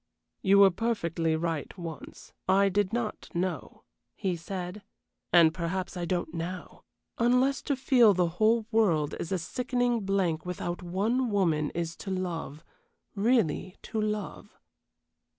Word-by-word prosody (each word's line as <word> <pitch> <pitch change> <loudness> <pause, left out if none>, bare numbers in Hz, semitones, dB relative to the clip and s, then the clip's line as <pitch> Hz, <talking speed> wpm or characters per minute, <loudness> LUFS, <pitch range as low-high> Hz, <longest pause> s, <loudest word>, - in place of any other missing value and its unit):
"You 195 0 +5
were 200 -1 +8
perfectly 170 -6 -1
right 165 +1 -3
once. 165 -3 -9 0.2
I 195 +1 +5
did 200 0 +1
not 230 -2 -3
know," 180 +1 -3 0.3
he 190 -3 -1
said; 180 +3 -6 0.5
"and 165 -2 +6
perhaps 185 +2 -3
I 175 -1 -3
don't 175 -2 -2
now, 175 +2 -6 0.4
unless 250 +3 +3
to 280 - -1
feel 245 -6 +5
the 180 -1 +2
whole 220 +1 +3
world 170 -10 +2
is 165 - -5
a 190 - +1
sickening 245 +6 -1
blank 190 -5 0
without 175 0 -4
one 215 +8 0
woman 165 -7 +1
is 170 0 -2
to - - -7
love 175 -5 -4 0.5
really 200 - +1
to 220 - -3
love." 210 -1 -4
185 Hz, 135 wpm, -28 LUFS, 170-220 Hz, 0.5 s, were